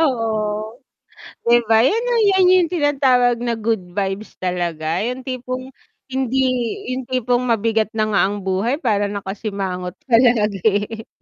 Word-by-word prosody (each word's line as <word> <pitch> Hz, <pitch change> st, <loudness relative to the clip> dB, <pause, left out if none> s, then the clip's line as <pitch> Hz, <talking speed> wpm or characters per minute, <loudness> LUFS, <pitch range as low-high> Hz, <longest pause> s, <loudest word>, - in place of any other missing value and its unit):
Oo, 220 Hz, -4 st, -1 dB, 0.7 s
'di 240 Hz, -, +7 dB
ba, 225 Hz, 0 st, +4 dB
'yan 440 Hz, -, +2 dB
'yung 475 Hz, -2 st, +2 dB
'yan 380 Hz, -1 st, +4 dB
'yung 355 Hz, -3 st, +3 dB
tinatawag 265 Hz, -7 st, +2 dB
na 235 Hz, -1 st, -1 dB
good 225 Hz, -2 st, -1 dB
vibes 195 Hz, +2 st, -4 dB
talaga, 170 Hz, -2 st, -2 dB
yung 250 Hz, +3 st, -4 dB
tipong 255 Hz, 0 st, -5 dB, 0.4 s
hindi 265 Hz, 0 st, -1 dB, 0.6 s
yung 255 Hz, -1 st, -5 dB
tipong 250 Hz, -1 st, +1 dB
mabigat 225 Hz, -3 st, +1 dB
na 215 Hz, -, +2 dB
nga 195 Hz, -, +3 dB
ang 205 Hz, -, -4 dB
buhay 195 Hz, +7 st, 0 dB
para 210 Hz, -8 st, 0 dB
nakasimangot 195 Hz, -2 st, -4 dB
pa 235 Hz, -4 st, +4 dB
lagi. 220 Hz, -2 st, +1 dB
225 Hz, 140 wpm, -20 LUFS, 205-255 Hz, 0.7 s, di